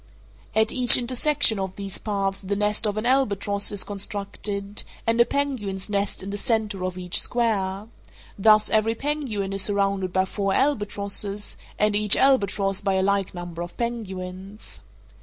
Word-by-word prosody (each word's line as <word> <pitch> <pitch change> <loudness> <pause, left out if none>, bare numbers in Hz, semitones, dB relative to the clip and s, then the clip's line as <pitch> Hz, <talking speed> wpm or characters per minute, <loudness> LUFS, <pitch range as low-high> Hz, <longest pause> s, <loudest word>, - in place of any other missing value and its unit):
At 220 0 +3
each 250 -1 +7
intersection 255 -1 +2
of 190 -1 -4
these 195 -1 -5
paths 195 -2 -2
the 200 +1 -3
nest 210 +1 +1
of 205 0 -2
an 215 - -2
albatross 205 -6 +1
is 205 -2 +1
constructed, 200 0 -2 0.2
and 230 +1 +3
a - - +6
penguin's 220 -10 -3
nest 200 -1 -2
in 195 - -6
the 205 - -4
centre 215 -5 -1
of 185 0 -3
each 180 -1 +2
square—thus 215 -1 0
every 220 +1 +2
penguin 245 -8 -3
is 195 - +1
surrounded 195 -1 0
by 190 +1 +1
four 195 0 -2
albatrosses, 205 -5 0 0.2
and 210 0 +1
each 210 0 +4
albatross 200 -7 +2
by 195 -1 0
a 190 - +1
like 200 -1 0
number 175 -1 -7
of 175 0 -7
penguins. 195 -4 -6
205 Hz, 155 wpm, -24 LUFS, 195-220 Hz, 0.2 s, each